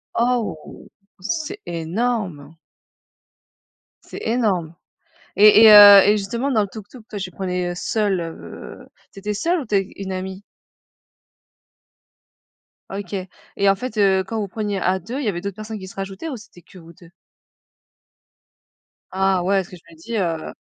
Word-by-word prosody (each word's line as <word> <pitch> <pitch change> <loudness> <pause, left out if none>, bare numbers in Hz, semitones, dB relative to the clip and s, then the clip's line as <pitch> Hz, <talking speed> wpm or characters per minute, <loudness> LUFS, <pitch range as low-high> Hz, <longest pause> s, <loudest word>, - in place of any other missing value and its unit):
Oh! 235 -9 -2 0.3
C'est 315 - -4
énorme! 170 - -3 1.5
C'est - - -10
énorme 200 -9 -1 0.6
et 210 +2 +7
et 220 - +10
heu, 205 -1 +11
et 210 +1 +4
justement 235 +7 -3
dans 220 -5 +2
le 200 - -4
tuk-tuk, 220 +3 -12
toi, 210 - -6
tu 190 -1 -5
prenais 180 -1 -3
seule, 200 0 -1
heu, 165 -1 -9 0.2
tu 195 - -13
étais 210 +1 -3
seule 335 - 0
ou 270 - -7
tu 210 - -4
es 195 0 -1
une 190 -1 -6
amie? 190 +1 -6 2.5
Ok 195 -1 -7 0.4
et 200 0 +3
en 195 - +4
fait, 225 +2 -7
heu, 190 -2 +3
quand 220 +4 -5
vous 205 - -3
preniez 205 0 -3
à 185 +1 0
2 230 +10 -6
il 285 - -3
y - - -1
avait 175 -4 -2
d'autres 200 0 -5
personnes 215 0 -7
qui 190 - -9
se - - -13
rajoutaient, 195 +9 -6
ou 265 - -5
c'était 180 -4 -16
que 185 - -18
vous 170 0 -15
2? 170 0 -18 2.0
Ah 190 -1 +1
ouais 195 +2 +2
parce 185 - -6
que - - -11
je 165 - -22
me - - -16
dis, 225 +8 -5
heu 165 -5 -2
200 Hz, 165 wpm, -21 LUFS, 185-220 Hz, 2.5 s, heu